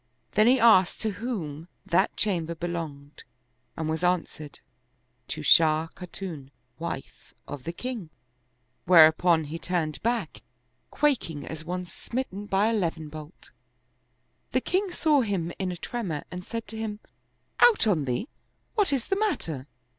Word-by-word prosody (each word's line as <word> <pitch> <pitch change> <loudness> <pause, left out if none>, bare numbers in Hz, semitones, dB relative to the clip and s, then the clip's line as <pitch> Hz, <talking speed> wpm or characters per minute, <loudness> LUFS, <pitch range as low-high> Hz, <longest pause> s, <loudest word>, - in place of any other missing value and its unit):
Then 215 +2 +4
he 255 +2 +5
asked 190 -7 +5
to 220 - 0
whom 180 - -5 0.2
that 190 +4 +2
chamber 170 -5 -1
belonged 160 -4 -5 0.5
and 160 - -2
was 160 +2 -2
answered, 165 -4 -1 0.7
*'To 155 0 -5
Shah 160 +1 +5
Khatun, 175 -6 -7 0.3
wife - - -7
of 145 -3 -7
the 170 - -2
king," 225 -2 -5 0.8
whereupon 165 0 +6
he 155 +3 -6
turned 160 -5 -2
back, 230 -7 -1 0.5
quaking 215 - 0
as 160 -1 -7
one 180 +2 -3
smitten 205 +2 -5
by 200 +2 +3
a - - +1
leven 165 -7 -1
bolt. 155 +2 -11 1.0
The 255 - +3
king 375 +5 0
saw 305 -5 +3
him 185 -7 -1
in 190 -2 -1
a 175 - -5
tremor 180 -8 -4
and 180 0 -6
said 230 +3 -5
to 220 - -6
him, 215 -1 -4 0.6
"Out 460 - +6
on 175 -10 +2
theel 125 - -1 0.5
what 415 -8 +2
is 270 -4 0
the 390 - 0
matter?" 160 - -2
180 Hz, 145 wpm, -27 LUFS, 160-225 Hz, 1.0 s, whereupon